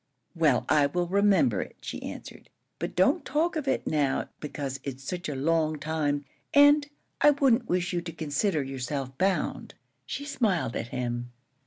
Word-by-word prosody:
"Well, 155 -6 +3
I 145 -2 +4
will 175 +5 -1
remember 200 +6 +3
it," - - -8
she - - -6
answered; - - -9 0.3
"but - - -4
don't - - +3
talk 335 +4 0
of 300 -3 -3
it - - 0
now, 145 -3 0
because 140 -3 -5
it's 135 -1 -6
such 175 +4 -4
a 145 - -3
long 155 +2 +1
time; 145 -1 -1 0.3
and 290 +1 +7 0.3
I 295 - +8
wouldn't 270 -4 +3
wish 180 0 0
you 175 - 0
to 170 -1 -6
consider 155 +1 -1
yourself 135 0 -4
bound." 190 +1 0 0.3
She 285 - -4
smiled 190 - 0
at - - -3
him. 120 0 -3
160 Hz, 165 wpm, -28 LUFS, 140-205 Hz, 0.3 s, I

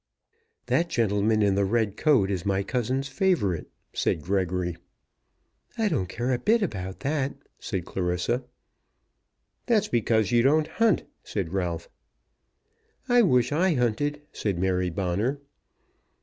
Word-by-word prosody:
"That 170 +1 +1
gentleman 110 -2 +2
in 100 -1 +3
the 100 +1 +2
red 105 0 +1
coat 125 -11 +3
is 90 -3 -2
my 100 -1 0
cousin's 130 +4 -1
favourite," 135 - 0 0.3
said 80 - 0
Gregory. 90 -2 -1 1.0
"I 220 -2 +2
don't 95 - -1
care 120 +6 -1
a 120 - 0
bit 220 - +3
about 95 - -4
that." 140 -1 -1 0.2
said 95 -6 -4
Clarissa. 90 +7 -1 1.2
"That's 225 -4 +2
because 110 -2 +1
you 120 -1 +4
don't 150 +5 +4
hunt," 225 +2 +2 0.2
said 95 -4 -4
Ralph. 85 -3 -2 1.2
"I 245 0 +5
wish 125 - +3
I 170 +3 +2
hunted," 145 +5 0
said 100 -5 -2
Mary 90 0 +1
Bonner. 100 - -1
110 Hz, 130 wpm, -26 LUFS, 95-145 Hz, 1.2 s, I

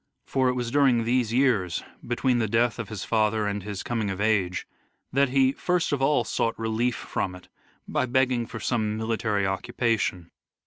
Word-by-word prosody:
For 130 -1 +1
it - - +1
was 120 -2 -2
during 130 -4 +4
these 120 -1 +1
years, 115 -9 +2 0.2
between 120 +1 +1
the 110 - +1
death 115 +3 +1
of 115 - -5
his 105 -5 -5
father 110 -1 +1
and 100 0 -2
his 100 0 -5
coming 115 -4 -1
of 95 0 -4
age, 100 -4 +1 0.5
that 140 0 +3
he 135 0 +4
first 180 +3 0
of 140 -2 0
all 135 -2 +3
sought 115 +1 -1
relief 115 +2 0
from 90 -2 -3
it 90 - -15 0.4
by 130 - 0
begging 125 -2 +1
for 115 - -7
some 110 -2 -1
military 110 -2 0
occupation. 95 -2 -1
115 Hz, 180 wpm, -26 LUFS, 105-125 Hz, 0.5 s, during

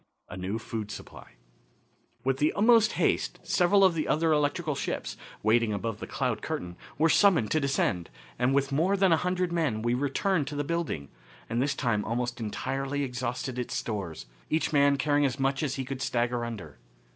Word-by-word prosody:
A - - -7
New 95 +4 -3
Food 110 -2 -5
Supply. - - -10 0.9
With 135 0 +1
the 150 +2 +2
utmost 225 +1 +5
haste - - 0
several 195 +2 +3
of 190 -2 +6
the 160 -2 -2
other 160 +1 +2
electrical 150 +2 0
ships, - - -3 0.3
waiting 110 0 +3
above 105 +1 -3
the - - -6
cloud - - -1
curtain, 90 0 -4 0.2
were 160 +3 +4
summoned 165 - +4
to 155 - +3
descend, 135 - 0 0.3
and, 125 +1 +3
with 140 0 +1
more 175 +8 +2
than 190 -2 +4
a 165 - +5
hundred 180 +1 -1
men, 140 -11 0
we 120 0 +1
returned 145 +5 0
to 150 - -5
the 145 - -1
building, 155 - -3 0.4
and 120 +1 -1
this 140 0 0
time 115 -7 0
almost 120 +1 -2
entirely 135 +6 -2
exhausted 125 0 -3
its 125 - -3
stores, 95 - -4 0.2
each 160 0 0
man 140 -1 +4
carrying 145 +1 +2
as 135 -1 0
much 135 0 +1
as 140 -3 -1
he 135 - -3
could 135 0 -5
stagger 120 -1 0
under. 95 - -8
135 Hz, 185 wpm, -28 LUFS, 115-155 Hz, 0.9 s, of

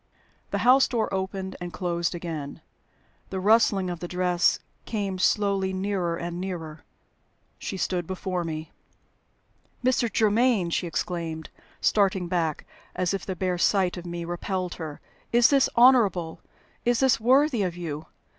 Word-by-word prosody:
The - - -1
house 260 +2 +6
door 230 -5 -1
opened 190 0 -3
and 175 0 -5
closed 170 +1 -2
again. 160 -5 -6 0.7
The 190 - -3
rustling 205 -1 +3
of 175 -1 -4
the 175 - -5
dress 180 -1 +2 0.3
came 200 -4 -3
slowly 195 -1 +1
nearer 185 -3 -1
and 175 +1 -4
nearer. 165 -5 -6 0.8
She 195 - -4
stood 180 -2 -1
before 185 -1 -3
me. 160 -1 -5 1.1
"Mr. 240 -3 +2
Germaine!" 215 -3 +2
she 175 - 0
exclaimed, 165 -2 -4 0.3
starting 195 -3 +2
back, 170 -4 -1 0.3
as 180 +1 0
if 195 - -4
the 190 - -2
bare 180 -1 -1
sight 185 -1 +2
of 175 -1 -8
me 170 0 -4
repelled 180 +1 -3
her. 155 -2 -6 0.3
"Is 240 +2 +5
this 275 -2 +4
honorable? 215 -10 +4 0.4
Is 240 0 +2
this 265 -3 +4
worthy 260 +1 +3
of 180 -3 -2
you? 155 -3 -5
185 Hz, 145 wpm, -26 LUFS, 170-205 Hz, 1.1 s, house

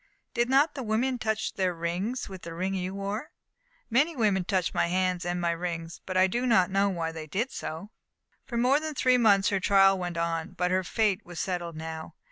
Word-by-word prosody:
"Did 240 0 +1
not 280 +4 +4
the 280 - -5
women 245 +3 0
touch 220 -1 -1
their 185 -2 0
rings 180 +9 -2
with 190 -2 -9
the 165 0 -8
ring 185 +3 -1
you 185 0 -3
wore?" 200 +7 -4 0.6
"Many 290 +8 +2
women 205 -6 +2
touched 185 -1 0
my - - +2
hands 180 0 0
and 175 0 -1
my 170 -1 +1
rings, 170 -1 -4
but 185 -1 -1
I 185 - +6
do 240 +7 -1
not 190 -6 +4
know 200 +1 +3
why 165 -3 -2
they 160 -1 -7
did 225 - -2
so." 165 +7 -6 0.5
For 240 -3 -5
more 255 +4 +4
than 310 -1 -5
three 255 -1 +3
months 200 -4 +5
her 195 - +1
trial 195 0 +5
went 175 -1 -4
on. 165 -1 -2
But 180 0 0
her 185 0 +2
fate 205 0 0
was 175 -2 -8
settled 175 -3 -3
now. 160 0 -7
190 Hz, 215 wpm, -28 LUFS, 175-225 Hz, 0.6 s, I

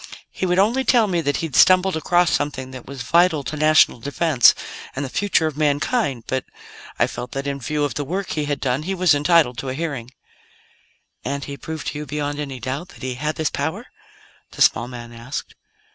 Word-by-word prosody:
He 185 - -2
would 180 0 +1
only 230 +7 +3
tell 240 -4 +4
me 175 -4 0
that 145 -2 0
he'd 150 - -6
stumbled 185 0 +5
across 175 +2 +2
something 130 -3 -2
that 130 -2 -10
was 135 -2 -6
vital 170 +2 +3
to 155 - -5
national 155 -4 +4
defense 140 0 +4 0.4
and 140 +1 -2
the - - -6
future 200 -5 +1
of 155 -3 -2
mankind; 145 - 0
but 130 -1 -2 0.5
I - - +4
felt 125 - -7
that, 135 +1 -3
in 140 -1 -3
view 150 +3 -2
of 145 - -1
the 145 - -3
work 185 +6 -3
he 150 -1 -1
had 145 -1 -2
done, 130 +1 0
he 190 +5 -3
was 180 -3 +4
entitled 145 -4 +3
to 135 - -4
a 130 - -3
hearing." 140 -7 -4 1.1
"And 140 0 -3
he 140 - -6
proved 160 +2 -7
to 150 - -6
you, 150 - -6
beyond 145 0 -3
any 135 -3 -5
doubt, 135 +8 -4
that 135 - -14
he 130 -1 -2
had 150 +5 -3
this 160 -2 -1
power?" 160 - -3 0.7
the - - +3
small 120 - +3
man 120 -1 -9
asked. 115 +4 -6
145 Hz, 210 wpm, -21 LUFS, 135-170 Hz, 1.1 s, stumbled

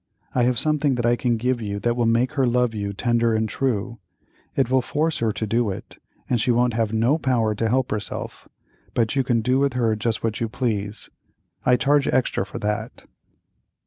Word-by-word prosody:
I 125 -1 +2
have 125 -1 +1
something 150 -1 +2
that 120 -1 -1
I 120 0 +4
can 120 -1 0
give 125 +1 0
you 100 -2 -3
that 120 +3 +1
will 120 -1 +1
make 120 +3 +2
her 135 -4 +1
love 125 -1 +2
you 100 -2 -3
tender 115 +2 +1
and 110 0 +1
true; 115 -1 -2 0.6
it 130 -2 +1
will 130 0 +4
force 155 +5 -1
her 115 -1 +1
to 110 - -3
do 115 +1 +1
it 95 - -8 0.3
and 120 -3 +1
she - - 0
won't 120 0 +3
have 110 -1 0
no 115 +8 +2
power 120 -6 +1
to 110 +2 -1
help 130 +1 +1
herself, 105 -1 -5 0.5
but 115 +2 +1
you 135 - +2
can 120 -2 +1
do 125 +4 +2
with 140 -1 +1
her 115 -3 +1
just 110 +1 -2
what 115 0 -2
you 115 - -1
please; 105 -3 -3 0.6
I 125 - +6
charge 140 +1 +2
extra 130 0 0
for - - -7
that." 105 +2 -3
120 Hz, 210 wpm, -23 LUFS, 110-130 Hz, 0.6 s, I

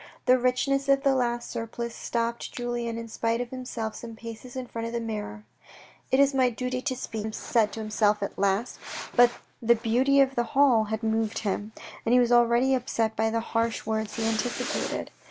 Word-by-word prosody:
The 255 0 +5
richness 275 +2 +1
of 275 0 +4
the 275 -2 +4
lace 240 -2 0
surplice 235 0 -5
stopped 235 0 -2
Julien 240 -1 -3
in 230 0 -6
spite 230 +1 -1
of 245 -1 -4
himself 245 -4 -4
some 230 -1 -8
paces 230 +2 -9
in 260 -1 -4
front 230 -1 -5
of 230 - -6
the 235 - 0
mirror. 210 - -5 0.3
" - - -24
It 260 - +4
is 280 0 +5
my 260 -2 +4
duty 250 +2 -3
to 260 -1 -1
speak," 220 -4 -5
he - - -4
said 220 -2 +1
to 225 - -5
himself 210 -1 +1
at 200 - -4
last. 200 +4 0 0.4
But 245 0 +7 0.3
the 235 0 +5
beauty 250 +5 +2
of 270 -1 +4
the 240 - +1
hall 250 -6 +5
had 220 +1 -4
moved 220 0 0
him, 205 +2 -2 0.3
and 230 - +1
he 250 - +7
was 245 -1 +3
already 240 +2 +4
upset 230 -3 0
by 220 0 +1
the 230 +1 0
harsh 230 0 -1
words 220 -1 -2
he 225 - -1
anticipated. 225 +2 -1
235 Hz, 205 wpm, -27 LUFS, 220-250 Hz, 0.4 s, But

